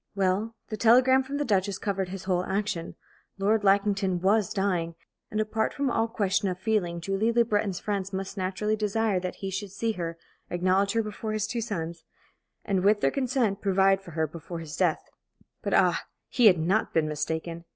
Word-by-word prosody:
Well, 195 +4 0
the 215 - -4
telegram 255 +4 +5
from 275 +2 -4
the 290 - -1
Duchess 200 -3 +1
covered 195 -3 -2
his 190 0 -6
whole 180 -1 0
action. 195 -3 -2 0.4
Lord 205 +2 +2
Lackington 195 -2 +2
was 205 +3 +2
dying; 185 -5 -1 0.3
and 215 - -2
apart 215 +1 -1
from 280 -2 0
all 225 0 +1
question 200 -2 0
of 180 - -3
feeling, 185 -4 0
Julie 195 +6 0
Le 235 0 +3
Breton's 205 -4 0
friends 200 -2 -3
must 195 0 -4
naturally 195 +3 -1
desire 215 -1 0
that 180 0 -4
he 190 - -3
should 195 +1 -4
see 225 +3 -1
her, 170 -4 -4 0.3
acknowledge 185 +3 +1
her 225 0 +1
before 215 +1 -5
his 215 -1 0
two 235 +2 -3
sons, 170 -7 -4 0.6
and, 190 -2 0
with 205 +1 +4
their - - +3
consent, 245 -7 0
provide 195 0 +3
for 190 - -12
her 160 - +2
before 165 +2 -8
his 160 -2 -7
death. 175 -2 0 0.5
But, - - 0
ah, - - +3 0.2
he 245 -3 +5
had 185 -4 +6
not 185 +7 0
been 160 -2 +3
mistaken! 160 +2 -3
195 Hz, 190 wpm, -27 LUFS, 185-215 Hz, 0.6 s, had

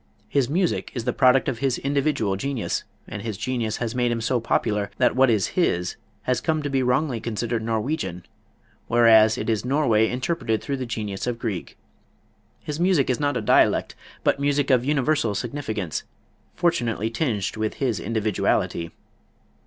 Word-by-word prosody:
His 135 -3 +1
music 175 +3 0
is 120 - -2
the 125 0 -1
product 130 0 +4
of 115 - -2
his 135 -2 0
individual 140 -7 0
genius, 135 +3 -2 0.2
and 105 - -6
his 110 -3 -4
genius 120 -3 -2
has 115 -1 -3
made 120 -1 +1
him 115 - -1
so 120 +2 0
popular 105 -3 0
that 125 -1 +3
what 130 0 +5
is 105 -5 +2
his 90 - 0 0.3
has 125 -1 0
come 155 -2 0
to 145 - -3
be 135 -1 +2
wrongly 125 0 +1
considered 115 0 -2
Norwegian, 110 - -2 0.6
whereas 110 -2 +6
it - - -4
is 110 -2 0
Norway 125 -5 +2
interpreted 125 -3 -1
through 140 -1 -3
the 130 -2 -4
genius 105 -2 -4
of 120 -1 -1
Grieg. 110 -7 -4 0.9
His 150 +1 -4
music 175 -7 +3
is 125 - -1
not 145 -1 0
a - - -2
dialect, 105 - +3 0.3
but - - +2
music 145 0 +1
of 125 -2 +4
universal 140 -5 +1
significance, 110 - -3 0.5
fortunately 115 -9 0
tinged 115 - -1
with 110 0 -2
his 120 -8 -1
individuality. 105 -5 0
120 Hz, 165 wpm, -24 LUFS, 110-140 Hz, 0.9 s, whereas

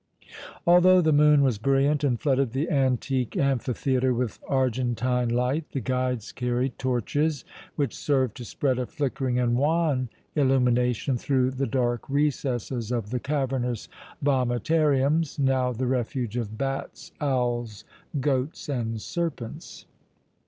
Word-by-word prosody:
Although 180 +1 +6
the 155 -2 +3
moon 150 -1 +5
was 125 -6 +1
brilliant 135 +4 +2
and 125 -5 +1
flooded 135 -4 +1
the 145 +6 -1
antique 130 -2 0
amphitheatre 130 -1 +1
with 120 -3 -2
argentine 125 -2 0
light, 125 +6 0
the 135 - -1
guides 125 -2 -2
carried 125 +1 -2
torches, 130 +4 -1 0.3
which 140 -6 -1
served 130 -6 0
to 125 - -7
spread 130 +2 -1
a 125 - -2
flickering 135 -4 -2
and 120 -1 +2
wan 145 -2 +1 0.3
illumination 125 -2 +2
through 130 0 +1
the 135 +1 -2
dark 120 0 -1
recesses 130 -5 -1
of 115 -3 -2
the 125 - -1
cavernous 130 -4 -2 0.3
vomitariums, 140 +3 +2
now 135 -2 +2
the 125 +2 -2
refuge 125 -2 -2
of 110 -3 -3
bats, 135 +1 -4
owls, 120 -6 -1 0.3
goats 135 +2 -1
and 115 -5 -2
serpents. 155 -9 -5
130 Hz, 125 wpm, -26 LUFS, 125-140 Hz, 0.3 s, Although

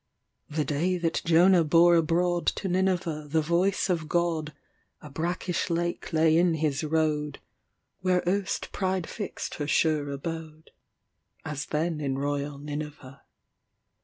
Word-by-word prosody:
The 150 0 -1
day 170 +5 0
that 170 -2 -1
Jonah 170 +2 +5
bore 170 +3 +5
abroadTo 175 +4 0
Nineveh 180 -4 0
the 160 +2 +2
voice 175 +6 +1
of 165 -4 -1
God,A 155 -3 -4
brackish 175 +4 -2
lake 170 +1 -2
lay 160 0 +4
in 175 -1 +3
his 150 -2 -1
road, 150 -2 0 0.6
Where 180 -1 +1
erst 195 +1 -1
Pride 185 -3 -1
fixed 205 - -5
her 145 - -1
sure 155 -2 +2
abode, 155 +2 -6 0.7
As 145 0 -4
then 160 +1 -1
in 135 -2 -1
royal 145 0 -2
Nineveh. 145 -2 -7
160 Hz, 125 wpm, -27 LUFS, 150-175 Hz, 0.7 s, Jonah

